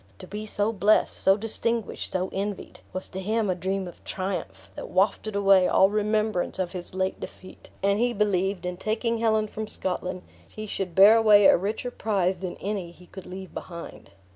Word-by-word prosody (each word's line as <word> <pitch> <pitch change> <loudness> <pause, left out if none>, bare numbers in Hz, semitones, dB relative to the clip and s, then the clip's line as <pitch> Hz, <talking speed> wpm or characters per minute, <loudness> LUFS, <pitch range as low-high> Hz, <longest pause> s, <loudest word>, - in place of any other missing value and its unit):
To - - -10
be 210 +1 -6
so 210 +2 0
blessed, 210 +1 +3
so 195 +1 +3
distinguished, 225 0 -2
so 185 0 -1
envied, 200 0 -4
was 185 - -4
to 190 - -6
him 215 0 0
a - - +2
dream 190 +1 -2
of 175 - -12
triumph, 100 - -5
that - - -8
wafted 200 +3 +1
away 195 -2 +5
all 195 +1 +4
remembrance 215 -2 0
of 185 -2 -2
his 180 0 -6
late 190 0 -1
defeat; 185 - -11
and 200 +1 +2
he 245 +1 +2
believed, 195 -3 0
in 180 0 -3
taking 225 +3 -1
Helen 220 -1 +2
from 215 +1 -6
Scotland, 185 -2 -2 0.3
he 215 - -7
should 190 -4 -4
bear 205 +4 +8
away 210 -2 +6
a - - +8
richer 215 +7 -2
prize 190 -6 0
than 185 -2 -4
any 195 -4 -3
he 175 +1 -16
could 190 +1 -11
leave 190 0 -8
behind. 170 - -9
195 Hz, 190 wpm, -26 LUFS, 185-215 Hz, 0.3 s, bear